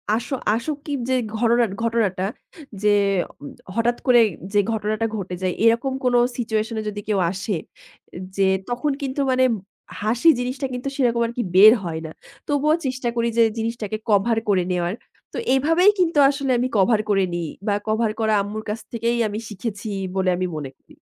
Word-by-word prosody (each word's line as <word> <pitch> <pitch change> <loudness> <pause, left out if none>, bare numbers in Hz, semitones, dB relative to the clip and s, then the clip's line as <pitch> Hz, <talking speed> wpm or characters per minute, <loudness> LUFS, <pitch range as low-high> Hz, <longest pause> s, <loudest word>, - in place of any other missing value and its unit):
আসো 240 +4 -3 0.2
আসোকি 290 +4 -4 0.2
যে - - +2 0.2
ঘররা 235 +1 +3 0.2
ঘটনাটা 215 -5 0 0.6
যে 210 - +4 0.5
উম 145 - -8 0.3
হঠাৎ 235 +1 +1
করেই 240 -3 +6 0.3
যে 205 - +4
ঘটনাটা 215 0 -1
ঘটে 190 -3 -4
যায়। 185 -1 0
এরকম 235 +4 +3
কোন 250 -1 +2 0.2
সিচুয়েশনে 220 -1 -1
যদি 205 0 -6
কেউ 205 -3 +1
আসে 195 +1 -3 0.8
যে, 195 -1 +3 0.2
তখন 250 +5 -1
কিন্তু 275 +1 -2
মানে 260 0 +3 0.6
হাসি 235 +9 +3
জিনিসটা 255 +3 -3
কিন্তু 250 +2 -3
সেরকম 235 -3 +2
আরকি 235 +1 -3
বের 215 +4 +9
হয় 160 -2 -4
না। 160 - -7 0.4
তবুও 295 +1 +2
চেষ্টা 255 -2 -2
করি 235 0 +1
যে 230 - +7
জিনিসটাকে 225 -2 -3
কভার 215 +3 +3
করে 185 -3 +3
নেওয়ার। 175 +1 0 0.4
তো - - -5 0.2
এভাবেই 330 +9 +4
কিন্তু 335 -4 +2
আসলে 275 -2 -1
আমি 250 - +1
কভার 210 +3 +4
করে 195 -2 +3
নিই 170 -2 -3 0.2
বা, 205 - +2
কভার 220 0 +1
করা 220 -1 +2
আম্মুর 210 +2 -5
কাছ 220 +2 -3
থেকেই 235 +1 0
আমি 210 +1 -4
শিখেছি 210 +1 -5 0.3
বলে 190 -1 +1
আমি 185 0 -1
মনে 135 -3 -6
করি। - - -22
230 Hz, 170 wpm, -22 LUFS, 205-250 Hz, 0.8 s, বের